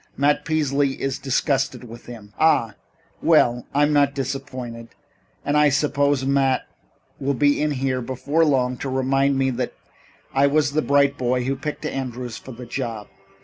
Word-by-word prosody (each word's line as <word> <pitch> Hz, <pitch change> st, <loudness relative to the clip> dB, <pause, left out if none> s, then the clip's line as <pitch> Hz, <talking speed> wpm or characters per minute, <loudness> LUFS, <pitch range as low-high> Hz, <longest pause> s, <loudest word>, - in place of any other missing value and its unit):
Matt 145 Hz, +1 st, +2 dB
Peasley 145 Hz, -3 st, 0 dB
is 135 Hz, -1 st, -2 dB
disgusted 135 Hz, 0 st, 0 dB
with 120 Hz, 0 st, -12 dB
him." 110 Hz, -4 st, -11 dB
"Ah! 120 Hz, -9 st, +3 dB, 0.5 s
Well, 125 Hz, -7 st, +3 dB
I'm 145 Hz, +1 st, +2 dB
not 140 Hz, -1 st, +3 dB
disappointed. 130 Hz, -3 st, -5 dB, 0.6 s
And 145 Hz, -, 0 dB
I 150 Hz, 0 st, +5 dB
suppose 140 Hz, -1 st, +1 dB
Matt 135 Hz, -1 st, +2 dB, 0.6 s
will 140 Hz, +1 st, -1 dB
be 145 Hz, +3 st, +2 dB
in 150 Hz, -, +1 dB
here 130 Hz, -2 st, -1 dB
before 130 Hz, +6 st, 0 dB
long 125 Hz, -4 st, +1 dB
to 135 Hz, -, -4 dB
remind 135 Hz, +1 st, +1 dB
me 135 Hz, 0 st, +1 dB
that 125 Hz, 0 st, -3 dB, 0.6 s
I 140 Hz, +1 st, +4 dB
was 145 Hz, 0 st, +2 dB
the 155 Hz, +2 st, +1 dB
bright 140 Hz, -1 st, +2 dB
boy 125 Hz, 0 st, 0 dB
who 135 Hz, +2 st, -1 dB
picked 150 Hz, +2 st, -5 dB
Andrews 125 Hz, -3 st, -4 dB
for 130 Hz, -, -11 dB
the 125 Hz, +1 st, -9 dB
job. 115 Hz, -4 st, -5 dB
135 Hz, 160 wpm, -22 LUFS, 125-145 Hz, 0.6 s, I